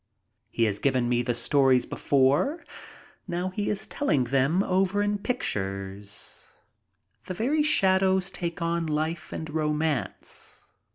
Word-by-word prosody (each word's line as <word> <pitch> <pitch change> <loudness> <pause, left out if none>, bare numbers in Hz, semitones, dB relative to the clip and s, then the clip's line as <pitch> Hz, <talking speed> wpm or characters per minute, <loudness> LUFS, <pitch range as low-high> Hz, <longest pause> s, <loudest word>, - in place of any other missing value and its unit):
He 115 - 0
has 105 -3 +1
given 130 -3 +1
me 120 0 +2
the 120 0 -1
stories 130 +1 +3
before. 145 - +1 0.6
Now 175 +2 -2
he 205 +2 -2
is 205 - -2
telling 150 - +1
them 135 +9 +2
over 190 +2 +1
in 205 0 0
pictures. 100 - -4 0.8
The 185 - -4
very 280 - +1
shadows 190 -8 +3
take 170 -1 -4
on 170 0 0
life 155 +2 -2
and 160 - -5
romance. 150 -2 -2
160 Hz, 125 wpm, -27 LUFS, 130-190 Hz, 0.8 s, stories